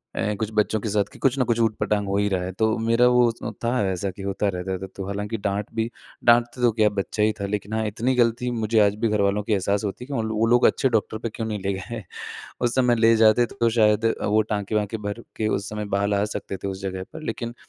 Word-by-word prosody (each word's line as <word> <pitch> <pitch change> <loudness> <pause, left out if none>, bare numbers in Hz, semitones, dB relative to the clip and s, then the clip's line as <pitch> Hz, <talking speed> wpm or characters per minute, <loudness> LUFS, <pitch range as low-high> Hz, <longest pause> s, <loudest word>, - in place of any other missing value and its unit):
अ, 105 - 0
कुछ 110 -1 -1
बच्चों 105 0 +1
के 110 - -3
साथ 100 -1 +1
कि - - -14
कुछ 135 0 +2
न - - +4
कुछ 120 0 0
ऊट-पटाँग 105 -2 +1
हो 100 +1 0
ही 100 0 +2
रहा 90 -2 -1
है, 95 - -4
तो 110 +2 +1
मेरा 115 +2 +3
वो 125 0 +5
उस 115 - -3 0.2
था 115 - +1 0.2
ऐसा 95 +1 -2
कि 95 - -11
होता 100 +1 -1
रहता 90 +1 -3
था। 95 - -6
तो 95 - -5
हालाँकि 105 +2 -3
डाँट 100 0 -2
भी 115 +1 0 0.4
डाँटते 120 +1 +4
तो 120 -2 +4
क्या, 105 -1 +3
बच्चा 105 +1 -2
ही 110 - +4
था, 100 - -1
लेकिन 105 +1 -4
हाँ 110 0 0
इतनी 115 +5 0
गलती 120 +1 +1
मुझे 110 -1 +1
आज 100 0 +1
भी 115 - +3
घरवालों 100 0 +1
की 105 - 0
एहसास 100 +1 0
होती 110 +5 -5
है - - -19
कि 145 - -6
वो 125 - 0 0.2
वो 115 - +4
लोग 120 +1 +4
अच्छे 135 - +2
डॉक्टर 110 -1 0
पे 115 - -4
क्यों 115 - -3
नहीं 105 -2 -3
ले 100 0 0
गए 110 +4 -6 0.6
उस 120 -1 +1
समय 125 -2 +3
ले 115 0 +5
जाते 110 +2 +5
तो 120 0 0
शायद 110 -1 +3
अ, 115 - 0
वो 105 +1 +3
टाँके-वाँके 105 +1 -1
भर 110 +3 -5
के 110 - 0
उस 100 -1 -1
समय 105 0 -4
बाल 100 +1 +1
आ 100 - +2
सकते 100 -1 -4
थे 100 - -5
उस 95 0 -5
जगह 95 -1 -4
पर। 160 - -8
लेकिन 120 -4 -4
110 Hz, 265 wpm, -24 LUFS, 100-115 Hz, 0.6 s, वो